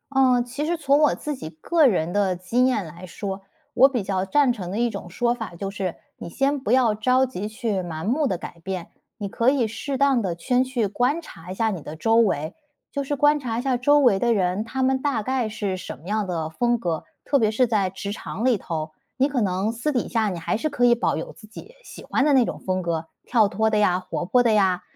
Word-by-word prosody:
呃， 255 -3 +4
其 260 +5 -4
实 340 +2 0
从 285 -3 +2
我 300 -1 +4
自 300 -1 -4
己 155 - -7
个 295 - +2
人 175 -7 0
的 195 -1 +1
经 205 +8 +1
验 250 -7 +1
来 170 +3 -10
说， 195 +1 -6 0.3
我 265 - +7
比 245 -6 -2
较 190 -1 -1
赞 275 +6 +3
成 195 -7 -5
的 195 - -4
一 240 +1 +2
种 180 - -7
说 240 +7 0
法 225 -7 -7
就 195 +3 -4
是， 195 -3 -3 0.2
你 - - -8
先 275 +9 0
不 260 - -3
要 250 -4 +4
着 255 +5 +2
急 210 -6 -5
去 220 -2 -2
盲 160 -3 -6
目 280 +7 +1
地 185 - -1
改 170 - -9
变， 185 -1 -5 0.3
你 200 -2 -4
可 230 +5 +2
以 265 -3 +2
适 265 +5 -4
当 275 -2 +3
地 185 -5 -2
先去 250 +5 0
观 250 - 0
察 170 - -12
一 - - -10
下 225 +2 +1
你 185 -6 -4
的 150 +2 -8
周 225 +8 +2
围， 180 -7 +2 0.4
就 280 - -2
是 290 - -1
观 295 +2 +4
察 235 -5 -3
一 - - -1
下 260 -1 0
周 290 +4 +4
围 245 -9 +4
的 235 +1 +2
人， 190 +1 0
他 260 +3 -2
们 260 0 +2
大 275 -6 0
概 260 0 0
是 205 -3 -3
什 175 - -7
么 155 +6 -15
样 210 -1 0
的 165 -3 -2
风 240 +9 +1
格， 170 -8 -3 0.2
特 280 - +2
别 220 - +3
是 225 +4 +2
在 210 -5 +1
职 195 +2 -6
场 210 +1 -6
里 250 -3 +3
头。 160 -4 -4 0.2
你 270 +2 +2
可 270 -3 -1
能 195 0 0
私 235 +6 -2
底 245 - -1
下 225 -3 +1
你 180 -3 -4
还 165 - -1
是 310 - -1
可 280 -5 -2
以 240 -1 +6
保 240 - 0
有 - - -5
自 215 - -15
己 310 - -12
喜 - - -11
欢 275 - 0
的 295 - +4
那 260 -2 +6
种 - - -4
风 185 0 0
格， 165 -2 -2 0.2
跳 220 -4 +3
脱 220 +3 +1
的 215 - +1
呀、 185 -4 +3
活 180 -1 -4
泼 245 +7 +3
的 235 - +3
呀， 190 -4 +3
225 Hz, 270 characters per minute, -23 LUFS, 185-260 Hz, 0.4 s, 我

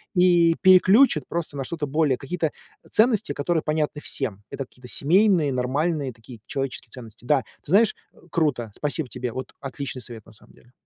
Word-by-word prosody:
И 175 -2 +5
переключит 185 - +6
просто 170 -3 -4
на 135 - -2
что-то 155 +1 -3
более, 145 -2 +1
какие-то 160 +2 -2 0.4
ценности, 220 - +3
которые 160 +3 0
понятны 150 -1 -1
всем. 110 -10 -5
Это 135 - -5
какие-то 125 0 -16
семейные, 175 - +3
нормальные 140 +2 -1
такие 115 +1 -13
человеческие 135 -4 -4
ценности. 115 -2 -12
Да, 145 +2 +3 0.2
ты 150 - -10
знаешь, 215 +2 +4 0.4
круто. 125 -9 0
Спасибо 150 -1 -3
тебе. 125 +2 -4
Вот 130 -1 -6
отличный 135 -2 -6
совет 115 -3 -11
на - - -16
самом 110 - -17
деле. 120 - -23
145 Hz, 165 wpm, -24 LUFS, 125-170 Hz, 0.4 s, переключит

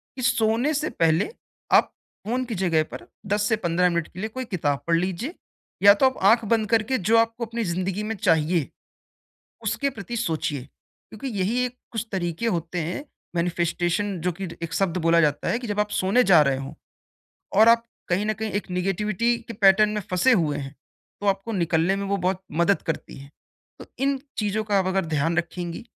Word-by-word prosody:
कि 260 - -6
सोने 235 +4 +2
से 300 +1 -1
पहले 165 - +2 0.4
आप - - +5 0.3
फ़ोन 250 +3 0
की 235 -3 -4
जगह 175 -4 +2
पर - - -8 0.2
10 205 +1 +1
से 220 - +3
15 180 -3 +1
मिनट 170 -2 -1
के 185 - -9
लिए 220 +3 -3
कोई 260 +3 -5
किताब 145 - -1
पढ़ 170 - +3
लीजिए 185 - -2 0.5
या 200 0 +10
तो 210 +6 +2
आप 260 - -2
आँख 230 0 +3
बंद 220 0 +1
करके 225 +3 +2
जो 220 +3 +3
आपको 230 +1 +1
अपनी 230 +1 -3
ज़िंदगी 185 +3 -2
में 220 +1 -3
चाहिए, 165 -2 +2 0.9
उसके 280 - 0
प्रति 235 -2 -6
सोचिए, 160 - -2 0.5
क्योंकि 220 +5 -7
यही 235 +7 +1
एक 250 0 -6 0.2
कुछ 225 -1 -3
तरीके 175 +2 -2
होते 175 -3 -2
हैं, 175 - -4 0.3
मैनिफेस्टेशन 175 +3 0
जो 180 +2 0
कि 190 +3 -6
र 170 - -9
एक 165 -1 -5
शब्द 185 -2 0
बोला 170 0 +5
जाता 150 -2 +1
है 235 - 0
कि 245 - -6
जब 205 0 -2
आप 210 0 +1
सोने 205 +7 +3
जा 175 -8 +6
रहे 140 -2 +2
हों 135 0 -6 0.9
और 220 +1 +8
आप 230 0 +5 0.3
कहीं 185 +4 +1
न 215 - +1
कहीं 220 0 -4
एक - - -24
नेगेटिविटी 210 +5 0
के 230 - -6
पैटर्न 205 0 +5
में 210 0 -2
फँसे 185 +9 +3
हुए 155 -8 +1
हैं, 140 0 -7 0.5
तो 205 - -2
आपको 195 +3 0
निकलने 170 -1 +1
में 200 0 -3
वो 200 0 0
बहुत 185 0 -1
मदद 170 +5 +2
करती 165 - -4
है। 140 +1 -12 0.5
तो - - -9 0.2
इन 275 0 +2 0.2
चीज़ों 215 0 0
का 205 -2 +1
अब 190 - 0
अगर 190 -1 0
ध्यान 160 +1 0
रखेंगी, 175 +2 -3
195 Hz, 200 wpm, -24 LUFS, 170-225 Hz, 0.9 s, या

